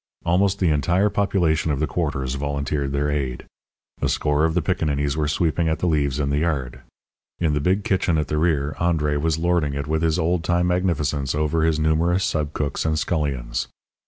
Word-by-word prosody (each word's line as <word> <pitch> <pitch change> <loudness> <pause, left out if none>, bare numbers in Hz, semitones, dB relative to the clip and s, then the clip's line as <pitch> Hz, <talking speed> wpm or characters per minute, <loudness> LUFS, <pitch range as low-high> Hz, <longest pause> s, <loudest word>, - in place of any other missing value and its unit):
Almost 95 +3 +2
the 90 -5 +2
entire 90 +8 +2
population 85 -6 +1
of 70 - -1
the 75 - +1
quarters 70 -6 -2
volunteered 70 0 -2
their 70 +1 0
aid. 65 -4 -3 0.6
A - - +1
score 75 +1 +1
of 80 0 0
piccaninnies 75 -5 0
were 75 -1 0
sweeping 80 +2 +1
at 80 - 0
the - - -3
leaves 75 -4 +1
in 70 -1 0
the 70 - +1
yard. 70 -7 -2 0.6
In 80 -3 +1
the 75 - +1
big 95 +7 +1
kitchen 95 -4 +1
at 75 - 0
the 75 - -1
rear 75 -3 +1
André 75 -4 +1
was 80 0 +1
lording 85 -4 +1
it 70 0 -3
with 80 +1 -1
his 80 0 +1
old 85 0 0
time 90 0 +1
magnificence 75 -6 0
over 75 +2 0
his 80 -1 +2
numerous 80 +4 +2
sub 75 -2 -1
cooks 70 -2 -2
and 80 -1 0
scullions. 70 -8 -2
75 Hz, 190 wpm, -23 LUFS, 70-85 Hz, 0.6 s, Almost